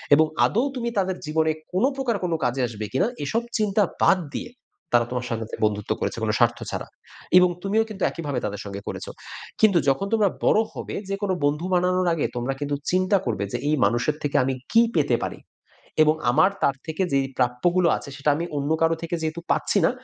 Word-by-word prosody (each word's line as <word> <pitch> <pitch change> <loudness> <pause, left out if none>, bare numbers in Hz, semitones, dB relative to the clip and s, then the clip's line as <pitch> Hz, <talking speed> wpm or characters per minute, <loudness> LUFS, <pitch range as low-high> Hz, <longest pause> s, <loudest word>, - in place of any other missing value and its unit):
এবং 155 +2 +5 0.2
আদৌ 235 +6 +1
তুমি 235 -2 -2
তাদের 190 -1 0
জীবনে 160 +1 +1 0.2
কোন 185 - +1
প্রকার 265 -4 -1
কোনো 170 -2 0
কাজে 125 +2 0
আসবে 110 -2 -6
কিনা, 135 - +2 0.2
এসব 225 +11 0 0.2
চিন্তা 210 -1 +2 0.2
বাদ 190 -1 +5 0.2
দিয়ে 240 -3 -5 0.4
তারা 120 -1 +5
তোমার 125 0 -2
সংগে 115 -1 -2 0.2
বন্ধুত্ব 105 -1 -2
করেছে - - -2
কোন 110 - +1
স্বার্থ 120 0 +3
ছাড়া। - - -4 0.5
এবং 180 0 +6
তুমিও 215 +3 +2
কিন্তু 200 -3 -5
একইভাবে 145 -6 -3
তাদের 100 0 -4
সঙ্গে 100 0 -6
করেছ। - - -5 0.6
কিন্তু 205 -5 +6
যখন 135 +9 +1
তোমরা 215 -3 +4 0.2
বড় 215 - +5
হবে - - -6
যে 195 - 0
কোনো 195 -2 0
বন্ধু 150 +4 0
বানানোর 180 0 +2
আগে 160 - 0
তোমরা 125 +3 -1
কিন্তু 145 0 -1 0.2
চিন্তা 185 +2 +3
করবে। 105 -5 -1
যে 120 - +1
এই 155 - +3
মানুষের 120 +8 +1
থেকে 145 0 -2
আমি 135 +1 0 0.2
কী 230 - +6
পেতে - - +3
পারি? - - -6 0.6
এবং 155 0 +4 0.2
আমার 130 +10 +4
তার 140 - +2
থেকে 160 +4 -2
যেই 135 -1 +2
প্রাপ্যগুলো 170 +9 +2
আছে - - -9
সেটা 145 0 +1
আমি 170 - -2
অন্য 145 +1 -2
কারো 165 0 +3
থেকে 165 +1 -3
যেহেতু 160 +1 -2
পাচ্ছি - - +2
না। - - +3
160 Hz, 200 wpm, -24 LUFS, 125-190 Hz, 0.6 s, এবং